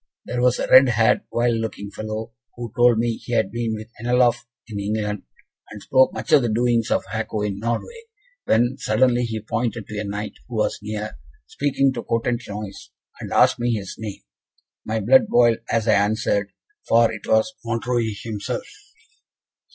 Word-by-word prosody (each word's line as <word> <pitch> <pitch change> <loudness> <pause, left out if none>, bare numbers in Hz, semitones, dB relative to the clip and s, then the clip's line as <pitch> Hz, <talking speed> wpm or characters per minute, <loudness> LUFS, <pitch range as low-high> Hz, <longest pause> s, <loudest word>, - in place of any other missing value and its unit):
There 125 - -2
was 125 0 +3
a - - -2
red 130 0 +8
haired, 110 -2 +3
wild 120 -1 +1
looking 105 -2 -5
fellow, 110 +2 -5 0.2
who 120 -2 -7
told 120 -2 +5
me 115 0 0
he 120 - -7
had 110 -4 +1
been 115 -1 -2
with 110 +1 -8
Anlaff 120 0 +2 0.2
in 105 -3 -6
England, 105 0 -2 0.5
and 105 - -9
spoke 130 0 +4
much - - -6
of 150 - +7
the 120 - 0
doings 115 0 +1
of - - +1
Hako 110 +1 -3
in 100 -1 -2
Norway; 120 - -4 0.4
when, 120 +4 +2
suddenly, 120 +2 +2
he 110 -1 -3
pointed 115 0 -2
to 105 0 -6
a - - -2
Knight 105 +1 -4
who - - -7
was - - 0
near, 105 0 -5 0.3
speaking 135 -1 0
to 120 - -5
a - - -5
Cotentinois, 115 -4 -3 0.3
and - - -7
asked - - +4
me 120 0 +1
his 100 -3 -5
name. 105 -3 -7 0.6
My 110 +1 -2
blood 130 +6 +5
boiled 120 -1 +4
as 115 0 0
I 110 - +5
answered, 100 0 +1 0.4
for 115 0 +4
it - - -8
was 110 +11 +2
Montreuil 115 0 -1
himself! 105 -3 -4
115 Hz, 175 wpm, -22 LUFS, 105-120 Hz, 0.6 s, red